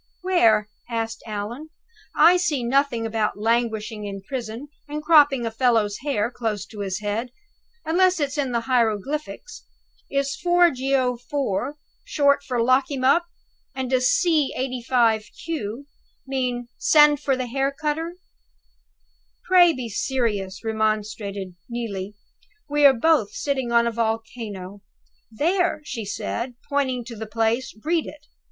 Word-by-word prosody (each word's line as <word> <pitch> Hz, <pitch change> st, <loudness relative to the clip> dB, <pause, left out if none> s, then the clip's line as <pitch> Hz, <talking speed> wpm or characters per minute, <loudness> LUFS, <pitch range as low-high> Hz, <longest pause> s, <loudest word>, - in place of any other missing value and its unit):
"Where?" 230 Hz, -, +3 dB, 0.2 s
asked 225 Hz, -1 st, -3 dB
Allan. 220 Hz, +8 st, -5 dB, 0.5 s
"I 340 Hz, +3 st, +7 dB
see 310 Hz, -8 st, 0 dB
nothing 245 Hz, -2 st, +1 dB
about 220 Hz, -2 st, -1 dB
languishing 220 Hz, -1 st, -1 dB
in 195 Hz, -1 st, -7 dB
prison, 240 Hz, +3 st, -6 dB, 0.2 s
and 300 Hz, +1 st, -4 dB
cropping 290 Hz, -6 st, +5 dB
a 225 Hz, -, -2 dB
fellow's 225 Hz, -3 st, +1 dB
hair 245 Hz, -5 st, -1 dB
close 220 Hz, -5 st, -3 dB
to 215 Hz, -, -10 dB
his 195 Hz, 0 st, -3 dB
head, 210 Hz, +4 st, -2 dB, 0.6 s
unless 365 Hz, +2 st, +3 dB
it's 285 Hz, -1 st, -1 dB
in 280 Hz, -4 st, -1 dB
the 235 Hz, -1 st, 0 dB
hieroglyphics. 245 Hz, -, -2 dB, 0.5 s
Is 275 Hz, 0 st, -1 dB
'4 350 Hz, -1 st, +4 dB
Geo. 260 Hz, -2 st, 0 dB
IV.' 255 Hz, +1 st, -2 dB, 0.3 s
short 285 Hz, -12 st, +2 dB
for 245 Hz, -3 st, -1 dB
'Lock 255 Hz, +2 st, +3 dB
him 270 Hz, -3 st, -3 dB
up'? 335 Hz, +7 st, +4 dB, 0.5 s
and 260 Hz, -1 st, -3 dB
does 255 Hz, -1 st, +3 dB
'c. 335 Hz, -, +2 dB
85 245 Hz, -4 st, +1 dB, 0.2 s
(q)' 280 Hz, -6 st, -4 dB, 0.4 s
mean, 250 Hz, -3 st, -2 dB
'Send 295 Hz, -, +5 dB
for 270 Hz, -1 st, 0 dB
the 255 Hz, -, -2 dB
hair 270 Hz, +3 st, -1 dB
cutter'?" 315 Hz, +4 st, -3 dB, 1.3 s
"Pray 355 Hz, -2 st, +6 dB
be 255 Hz, -6 st, -5 dB
serious," 210 Hz, -5 st, -2 dB
remonstrated 215 Hz, -3 st, -2 dB, 0.2 s
Neelie. 210 Hz, -4 st, -5 dB, 0.5 s
"We 295 Hz, -1 st, +5 dB
are 265 Hz, -4 st, +3 dB
both 305 Hz, -8 st, +3 dB
sitting 265 Hz, -4 st, -2 dB
on 235 Hz, 0 st, +4 dB
a 235 Hz, -, 0 dB
volcano. 220 Hz, -4 st, -4 dB, 0.5 s
There," 335 Hz, -, +1 dB
she 235 Hz, -7 st, -5 dB
said 235 Hz, +4 st, -4 dB
pointing 260 Hz, -4 st, -1 dB
to 235 Hz, -1 st, -8 dB
the 220 Hz, 0 st, -6 dB
place. 225 Hz, +3 st, -1 dB
"Read 330 Hz, 0 st, +1 dB
it! 295 Hz, -1 st, -11 dB
250 Hz, 135 wpm, -23 LUFS, 220-285 Hz, 1.3 s, I